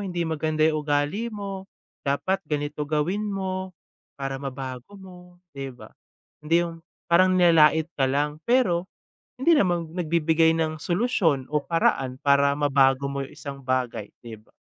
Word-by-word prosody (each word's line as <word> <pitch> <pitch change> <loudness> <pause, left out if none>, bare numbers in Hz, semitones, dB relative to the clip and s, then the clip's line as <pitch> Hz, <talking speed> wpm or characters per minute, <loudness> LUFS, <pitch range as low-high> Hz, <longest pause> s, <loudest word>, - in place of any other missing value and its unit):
hindi 175 -3 -2
maganda 155 -1 +1
yung 155 -1 0
ugali 150 +11 -1
mo. 195 -2 -7 0.3
Dapat 185 +8 -1
ganito 150 0 -2
gawin 170 +8 -1
mo, 190 -1 -3 0.5
para 135 0 -4
mabago 135 +7 -7
mo." 180 -1 -14 0.2
'di 135 -1 -5
ba? 125 - -13 0.5
Hindi 170 +3 +2
yung 165 -1 -10 0.2
parang 185 +2 +4
nilalait 160 -2 +5
ka 135 - +1
lang 150 +3 -1
pero, 195 -7 +1 0.5
hindi 305 +6 +4
naman 175 - +1
nagbi-bigay 165 -1 +2
ng 155 -2 -2
solusyon 175 - +1
o 150 - +2
paraan 135 -6 0
para 140 0 +3
mabago 140 -2 +3
mo 140 0 -3
yung 135 - -8
isang 140 -1 -8
bagay, 125 -5 -2
'di 110 -2 -10
ba? - - -30
155 Hz, 150 wpm, -25 LUFS, 140-180 Hz, 0.5 s, nilalait